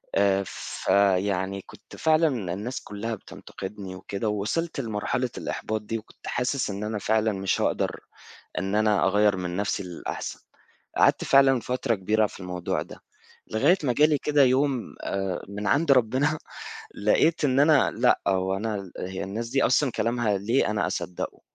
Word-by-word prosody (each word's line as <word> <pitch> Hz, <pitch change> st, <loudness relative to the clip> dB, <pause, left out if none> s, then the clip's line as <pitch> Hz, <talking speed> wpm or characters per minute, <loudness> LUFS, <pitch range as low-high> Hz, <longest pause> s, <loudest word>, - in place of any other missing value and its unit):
آآ 100 Hz, 0 st, +3 dB
فيعني 100 Hz, 0 st, 0 dB
كنت -, -, -15 dB
فعلًا 155 Hz, -, +2 dB
الناس 115 Hz, +7 st, -4 dB
كلّها 110 Hz, +2 st, -4 dB
بتنتقدني 95 Hz, -1 st, -9 dB
وكده 100 Hz, +3 st, -3 dB
ووصلت 105 Hz, +12 st, -2 dB
لمرحلة 115 Hz, +1 st, -1 dB
الإحباط 110 Hz, 0 st, -3 dB
دي 110 Hz, +2 st, -3 dB
وكنت 110 Hz, -, -13 dB
حاسس 130 Hz, -1 st, -1 dB
إن 100 Hz, +1 st, -4 dB
أنا 105 Hz, 0 st, -2 dB
فعلًا 110 Hz, +2 st, +1 dB
مش 95 Hz, -1 st, -1 dB
هاقدر -, -, 0 dB, 0.6 s
إن 95 Hz, +3 st, -2 dB
أنا 105 Hz, -2 st, +3 dB
أغير 105 Hz, 0 st, +3 dB
من 90 Hz, -1 st, -4 dB
نفْسي 100 Hz, 0 st, -1 dB
للأحسن 90 Hz, -2 st, -6 dB, 0.6 s
قعدت -, -, +4 dB
فعلًا 135 Hz, -2 st, +5 dB
فترة 125 Hz, +1 st, -1 dB
كبيرة 105 Hz, +2 st, +1 dB
في 100 Hz, -, -12 dB
الموضوع 90 Hz, -1 st, -2 dB
ده. -, -, -12 dB, 0.5 s
لغاية 140 Hz, +12 st, +4 dB
ما 125 Hz, -, +2 dB
جا 150 Hz, +5 st, +5 dB
لي 150 Hz, -2 st, +1 dB
كده 150 Hz, 0 st, +3 dB
يوم 130 Hz, -1 st, +1 dB
آآ 95 Hz, -2 st, -2 dB
من 105 Hz, +1 st, -5 dB
عند 145 Hz, +8 st, +3 dB
ربنا 135 Hz, +5 st, +2 dB, 0.6 s
لقيت 155 Hz, +11 st, +2 dB
إن 135 Hz, 0 st, +2 dB
أنا 150 Hz, -1 st, +5 dB
لأ 125 Hz, +3 st, +3 dB
هو 95 Hz, 0 st, +1 dB
أنا 100 Hz, -2 st, -3 dB
هي 95 Hz, +1 st, -4 dB
الناس 110 Hz, +5 st, -4 dB
دي 135 Hz, -, +2 dB
أصلًا 130 Hz, +2 st, +3 dB
كلامها 115 Hz, -3 st, 0 dB
ليه 115 Hz, +5 st, +1 dB
أنا 105 Hz, -, 0 dB
أصدقه 90 Hz, -, -4 dB
105 Hz, 155 wpm, -26 LUFS, 100-130 Hz, 0.6 s, فعلًا